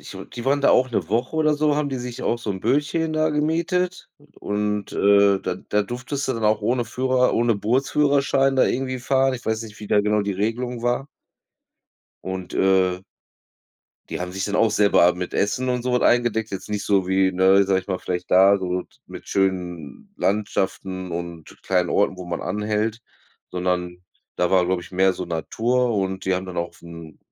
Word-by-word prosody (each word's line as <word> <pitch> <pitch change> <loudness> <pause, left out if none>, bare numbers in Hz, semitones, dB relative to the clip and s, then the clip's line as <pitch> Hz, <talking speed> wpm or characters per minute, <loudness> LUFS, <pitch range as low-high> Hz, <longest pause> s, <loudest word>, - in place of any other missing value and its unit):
Ich - - -11
meine, - - -8
die 120 - -8
waren 140 +1 +2
da - - +4
auch 130 0 +3
'ne 95 -8 -2
Woche 120 +7 -1
oder 155 -1 +3
so, 150 0 +1
haben 150 -1 0
die 135 - -3
sich 125 -1 -6
auch 120 - 0
so 115 -3 -4
'n 95 -1 -4
Bötchen 150 +6 0
da 155 0 +1
gemietet. 170 +4 -1 0.3
Und, 105 0 -2
äh, 100 -1 +4
da 90 - -3
da 105 +2 -1
durftest 125 +5 -4
du 130 - 0
dann 115 -1 -3
auch 105 0 +3
ohne 120 +3 0
Führer, 130 0 +1
ohne 115 0 +2
Bootsführerschein 135 +4 +2
da - - +5
irgendwie 130 0 -2
fahren. 135 +1 +2
Ich 120 - -8
weiß 110 0 -1
nicht, 110 -1 -11
wie 105 - -7
da 105 - +4
genau 105 0 +1
die 100 0 -2
Regelung 115 +4 -2
war. 120 +3 0 1.2
Und, 95 -1 -5
äh 95 -1 +2 1.1
die - - -4
haben 90 0 -4
sich 95 0 -3
dann 105 0 -2
auch 115 -2 +3
selber 100 -4 +4
mit 90 0 -5
Essen 125 +5 0
und 125 -1 -1
so 125 - -1
was 125 - +2
eingedeckt. 115 -2 +2
Jetzt 100 +2 -6
nicht 105 -1 -2
so 95 -3 +2
wie, 95 0 +2
ne, 95 +2 +4
sage 95 -1 +1
ich 90 - -19
mal, 95 -2 -1
vielleicht 90 0 -4
da 95 +2 +6
so 90 -1 -2
t - - -28
mit - - -11
schönen 95 - -2
Landschaften 95 -2 -2
und 85 -1 -6 0.2
kleinen 90 -2 0
Orten, 100 -2 +1
wo 90 - -8
man 85 -1 -4
anhält, 105 +3 -2 0.5
sondern 90 -1 -2 0.3
da 90 - +1
war, 95 -2 +4
glaube 90 0 0
ich, - - -14
mehr 95 +1 +3
so 90 - -6
Natur 115 +8 0
und 95 -1 -2
die 95 -1 +1
haben 95 +1 -3
dann 90 -1 -8
auch 85 0 -2
'n 85 -2 -11
105 Hz, 200 wpm, -22 LUFS, 95-125 Hz, 1.2 s, da